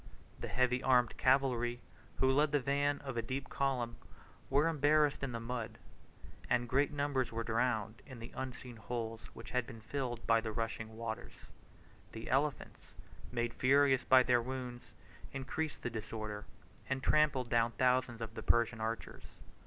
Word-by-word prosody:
The - - -4
heavy 125 0 +1
armed 125 -3 +3
cavalry, 125 -2 +2 0.4
who 130 0 +3
led 145 +2 +3
the 145 - +3
van 145 +2 +1
of 135 -4 -5
a - - +2
deep 130 +4 -4
column, 125 -4 -1 0.5
were 145 +4 +4
embarrassed 150 -1 +3
in 135 -2 -2
the 115 - -3
mud, 115 -1 -4 0.7
and 120 - +2
great 140 +5 +2
numbers 140 -4 0
were 115 0 -2
drowned 115 0 0
in 130 -3 -9
the 115 +1 -9
unseen 125 -2 -6
holes 115 0 -4
which - - -9
had 125 -2 0
been 115 -1 -9
filled 120 -1 -4
by 115 -1 +4
the 110 -1 -3
rushing 110 0 -4
waters. 115 0 -6 0.6
The 110 0 -6
elephants, 140 +2 -1 0.4
made 120 -1 -1
furious 135 +1 +4
by 130 -1 +6
their 125 -1 +3
wounds, 125 -1 -5 0.5
increased 145 +3 -3
the 120 - -2
disorder, 110 -1 -5 0.4
and 135 0 -1
trampled 145 -5 +3
down 115 0 +3
thousands 125 -2 +2
of 115 -1 -5
the - - -6
Persian 120 -1 +2
archers. 115 +1 -4
125 Hz, 160 wpm, -34 LUFS, 115-135 Hz, 0.7 s, by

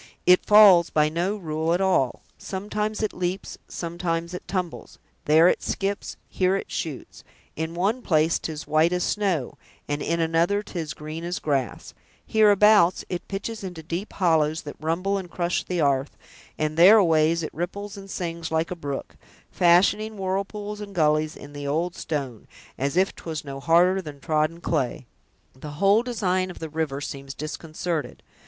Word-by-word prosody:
It 180 0 +6
falls 200 -5 +8
by 150 -1 +2
no 175 +6 -1
rule 160 -2 -1
at - - -1
all; 185 -10 +1
sometimes 210 +2 -3
it 215 - -1
leaps, 180 +1 -4
sometimes 170 0 -3
it 180 - -7
tumbles; 180 -3 -4 0.3
there 160 +3 +6
it - - +2
skips; 200 0 -3
here 185 0 +1
it 195 - -5
shoots; 155 -5 -6 0.3
in 160 +1 -4
one 205 +8 0
place 160 -5 +2
'tis 155 -1 -6
white 155 +3 +3
as 180 0 0
snow, 190 -11 -1 0.3
and 145 0 -2
in 170 +1 -1
another 165 +5 +1
'tis 165 -7 -5
green 155 +2 -7
as 175 +1 -3
grass; 135 -5 -2 0.3
hereabouts, 210 -3 +5
it 180 - -5
pitches 205 +2 -5
into 180 -4 -7
deep 175 +6 -4
hollows, 160 -4 +1
that 145 - -8
rumble 185 +6 -1
and 180 -2 -8
crush 175 0 -1
the 180 -1 -3
'arth; 140 -2 +1 0.4
and 155 0 -2
thereaways, 170 -4 +6
it 155 - -5
ripples 200 +5 -5
and 195 -1 -10
sings 170 -3 -4
like 160 +2 0
a - - -2
brook, 145 -5 -6 0.4
fashioning 200 +5 +3
whirlpools 200 +2 -3
and 200 -1 -9
gullies 155 -1 +2
in 145 0 -12
the 145 0 -6
old 165 +5 -1
stone, 135 -8 -4 0.3
as 140 +5 -2
if 190 +1 +3
'twas 160 -3 -6
no 135 -1 -6
harder 175 +5 +3
than 150 -5 -9
trodden 155 +2 0
clay. 130 -7 -1 0.5
The 145 +3 -9
whole 200 +5 +4
design 185 -7 -1
of 180 - -9
the 160 - -6
river 150 -3 -3
seems 140 -1 -7
disconcerted. 155 +1 -4
170 Hz, 165 wpm, -25 LUFS, 155-190 Hz, 0.5 s, falls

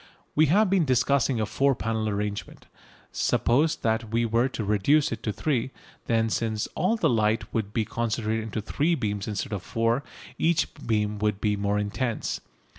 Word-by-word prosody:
We 155 +1 +4
have 205 +8 +4
been 190 -2 +3
discussing 130 -2 +2
a 110 - +1
four 135 +6 +2
panel 110 -2 -1
arrangement. 105 0 -4 0.5
Suppose 145 +7 +2
that 110 0 -1
we 115 +1 +1
were 115 +3 +2
to 115 - -4
reduce 105 +9 +3
it 115 -2 -4
to 110 - -1
three. 130 +1 -1 0.4
Then, 115 -1 +2
since 110 -2 -1
all 185 +8 +1
the 195 -8 +2
light 110 -4 +1
would 105 -3 -1
be 110 0 0
concentrated 115 0 -1
into 110 0 -3
three 150 +10 +1
beams 105 -6 -2
instead 105 0 -3
of 100 - -2
four, 115 +6 0 0.4
each 165 0 +1
beam 105 -2 0
would 105 -1 0
be 105 -1 +1
more 100 0 0
intense. 110 +3 -2
115 Hz, 175 wpm, -26 LUFS, 105-135 Hz, 0.5 s, We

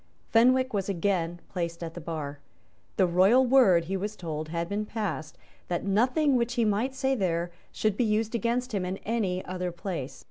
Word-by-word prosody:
Fenwick 255 +2 +4
was 200 -1 -1
again 175 -2 0
placed 170 -2 -4
at 165 -1 -5
the 175 - -7
bar. 150 -3 -5 0.6
The 190 - +5
royal 190 +9 +5
word, 230 -10 +5
he 190 +3 -2
was 205 +3 -3
told, 155 -4 -5
had 170 +1 -2
been 205 +2 -2
passed 210 -8 -4 0.3
that 175 +1 -2
nothing 255 +8 +3
which 240 0 0
he 235 -3 +2
might 220 +6 0
say 265 0 +1
there 175 -6 -1 0.2
should 215 -2 0
be - - +3
used 220 0 0
against 240 +2 0
him 195 -3 0
in 185 +1 -3
any 200 -5 -1
other 180 -1 -3
place. 175 -6 -5
195 Hz, 185 wpm, -28 LUFS, 175-235 Hz, 0.6 s, The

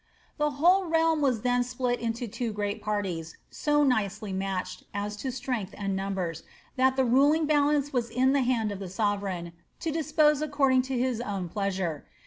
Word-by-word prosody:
The 300 0 +2
whole 360 +5 +4
realm 325 -1 +2
was 255 -6 +1
then 245 +1 +2
split 245 0 -2
into 235 +1 -3
two 230 +2 -3
great 205 +1 -3
parties, 195 -6 -3
so 295 -1 +2
nicely 215 -5 0
Batched, 190 -1 -3
as 205 +1 -2
to 260 +5 -3
strength 245 -5 -4
and 195 -1 -2
numbers, 190 -4 -3 0.3
that 260 0 +3
the 265 -1 +2
ruling 285 +6 +4
balance 290 -1 +2
was 240 -2 0
in 255 +3 +2
the 280 - +3
hand 240 -4 +1
of 200 - -5
the 195 -2 -6
sovereign, 195 -4 -2 0.3
to 325 - -2
dispose 300 -1 +2
according 275 -3 +3
to 265 - -1
his 245 -1 0
own 195 -6 -3
pleasure. 190 -6 -2
240 Hz, 175 wpm, -28 LUFS, 200-275 Hz, 0.3 s, whole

